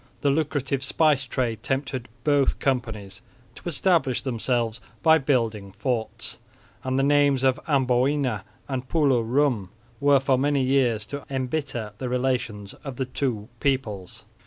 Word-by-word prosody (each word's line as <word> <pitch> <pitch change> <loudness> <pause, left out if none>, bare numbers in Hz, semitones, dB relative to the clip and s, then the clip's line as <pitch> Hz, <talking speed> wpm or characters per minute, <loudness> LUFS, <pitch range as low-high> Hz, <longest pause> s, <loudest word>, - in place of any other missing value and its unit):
The 145 - +3
lucrative 140 -2 -1
spice 145 -1 +2
trade 120 -4 -2
tempted 135 -1 -2 0.2
both 145 -2 +3
companies 115 -7 -2 0.3
to - - -6
establish 160 -5 +1
themselves 120 -2 -1 0.2
by 160 0 +6
building 115 -8 0
forts; 120 -2 -3 0.4
and 130 0 -1
the 135 - +3
names 140 -2 +3
of 130 +1 +3
Amboina 130 - +2 0.3
and 130 -2 -4
Pulo 140 -7 +3
Rum 120 -4 +1 0.3
were 140 -1 +5
for 130 -1 +2
many 140 0 +2
years 125 -5 +2
to 140 +5 -6
embitter 130 -4 -3
the 130 - -3
relations 125 -5 -1
of 135 -3 -6
the 130 - -2
two 125 -5 -2
peoples. 110 -10 -2
130 Hz, 135 wpm, -25 LUFS, 120-140 Hz, 0.4 s, by